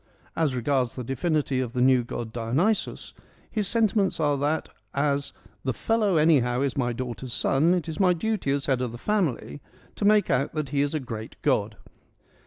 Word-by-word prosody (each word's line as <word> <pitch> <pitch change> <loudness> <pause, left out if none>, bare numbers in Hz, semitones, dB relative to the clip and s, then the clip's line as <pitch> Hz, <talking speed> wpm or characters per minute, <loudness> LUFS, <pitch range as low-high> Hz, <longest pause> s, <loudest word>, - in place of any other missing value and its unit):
As 155 -5 +1
regards 125 0 0
the 125 - -4
divinity 135 +1 0
of 125 -2 -3
the 125 - -2
new 130 -1 +5
god 115 -1 -6
Dionysus, 135 - -1 0.4
his 210 -3 0
sentiments 210 -4 +1
are 145 -2 +2
that, 145 +3 -1 0.3
as 140 0 0 0.2
' - - -34
The 130 -3 -1
fellow 215 - +1
anyhow 135 -6 +3
is 140 -1 0
my 120 -3 0
daughter's 120 0 -5
son: 160 +7 +2
it 175 -3 -2
is 160 - -5
my 185 -2 +5
duty 205 -2 -2
as 140 0 0
head 130 -3 +1
of 125 -2 -2
the - - -6
family 165 - -1 0.4
to - - -3
make 210 0 +4
out 135 +3 +1
that 150 -3 -2
he 140 0 +1
is 145 +2 0
a - - +1
great 115 -4 -7
god - - +1
140 Hz, 190 wpm, -26 LUFS, 125-170 Hz, 0.4 s, new